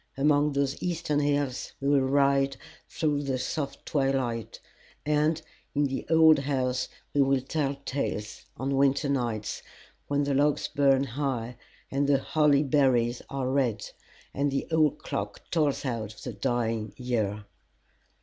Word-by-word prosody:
Among 145 +1 +3
those 140 0 -1
eastern 170 -4 -1
hills 145 -3 -1
we 140 - -2
will 145 -1 +5
ride 140 0 +2 0.3
through 150 -3 0
the 135 -2 -1
soft 140 +2 -4
twilight, 135 -5 -1 0.5
and 150 +2 +2 0.4
in 145 - +3
the 135 -1 -3
old 160 -2 +6
house 130 -2 -1 0.3
we 145 - +3
will 135 0 +3
tell 140 +1 -1
tales 110 -6 -3
on 135 +2 -1
winter 140 +1 +3
nights, 120 -6 -2 0.5
when 145 0 +1
the 140 0 0
logs 145 +2 +2
burn 135 -1 +3
high, 125 -3 -3 0.4
and 140 +1 +1
the 140 -1 +4
holly 150 0 +3
berries 125 -4 +2
are 135 -2 -2
red, 130 -5 0 0.4
and 140 +1 +1
the 135 0 -1
old 155 -2 +3
clock 100 0 -4
tolls 150 -4 +1
out 110 -4 -3
the 125 - -5
dying 115 -1 -1
year. 110 -5 -2
135 Hz, 140 wpm, -28 LUFS, 125-145 Hz, 0.5 s, old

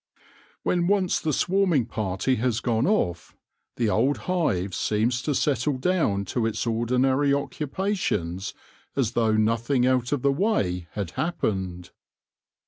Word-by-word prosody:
When 175 -1 +1
once 190 -2 +2
the 155 - -1
swarming 180 - +2
party 110 +3 -1
has 120 0 0
gone 120 +1 0
off, 90 - 0 0.4
the 115 -3 +1
old 130 +7 +2
hive 100 - 0
seems 115 +6 0
to 145 +1 -1
settle 140 0 +1
down 130 - +1
to 115 +3 -1
its 115 - -2
ordinary 125 +5 +1
occupa 150 +8 -1
tions 95 - -2 0.4
as 125 -5 +1
though 115 -2 +2
nothing 115 +4 +2
out 125 -1 +1
of 145 -4 -1
the 140 - +4
way 100 - 0
had 100 -5 -4
happened. 95 - -2
125 Hz, 135 wpm, -25 LUFS, 105-150 Hz, 0.4 s, the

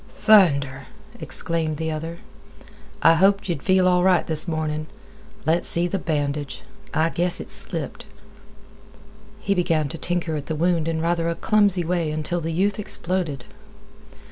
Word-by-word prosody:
"Thunder!" 140 -10 +3 0.3
exclaimed 165 -2 -1
the 160 +1 -3
other. 160 +2 -5 0.9
"I 165 - +7
hoped 195 +4 +2
ye'd 165 -6 -3
feel 185 -1 +3
all 180 -1 +3
right 185 -1 +3
this 160 +1 +1
mornin'. 155 -1 -3 0.6
Let's 165 +3 +1
see 170 +1 +4
th' 185 +1 -4
bandage—I 155 +4 -3
guess 175 +1 -1
it's - - +1
slipped." - - -3 1.3
He 200 - 0
began 165 -5 0
to 165 - -7
tinker 175 -2 -2
at 145 -1 -6
the 160 - -3
wound 165 0 0
in 160 -1 -2
rather 170 0 0
a 170 - -2
clumsy 200 -4 +2
way 170 -1 -1
until 155 +3 -3
the 165 +1 -3
youth 195 +5 0
exploded. 175 -9 0
165 Hz, 145 wpm, -22 LUFS, 155-180 Hz, 1.3 s, I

